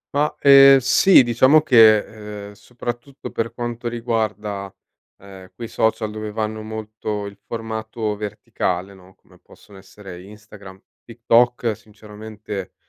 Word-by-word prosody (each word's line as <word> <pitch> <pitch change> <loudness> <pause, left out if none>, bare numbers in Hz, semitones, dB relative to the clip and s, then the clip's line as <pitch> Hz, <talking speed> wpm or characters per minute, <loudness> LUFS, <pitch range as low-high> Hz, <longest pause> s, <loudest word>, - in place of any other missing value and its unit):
Ma, 150 +1 +1
ehm, 135 -1 +8
sì, 135 +5 +5
diciamo 130 +5 +4
che, 115 -7 +6 0.5
ehm, 105 - -13
soprattutto 120 +5 -8
per 115 0 -3
quanto 120 0 -5
riguarda, 110 -4 -4 0.4
ehm, 95 -1 -14
quei 115 - -8
social 110 0 -1
dove 110 0 -7
vanno 110 0 -4
molto 110 -1 -6
il 100 -1 -10
formato 110 -1 -5
verticale, 100 -2 -4
no, 95 0 -19
come - - -25
possono 100 - -19
essere 95 -2 -13
Instagram, 100 -2 -14 0.2
TikTok, 120 0 +1
sinceramente, 105 -2 -10
110 Hz, 120 wpm, -20 LUFS, 105-120 Hz, 0.5 s, ehm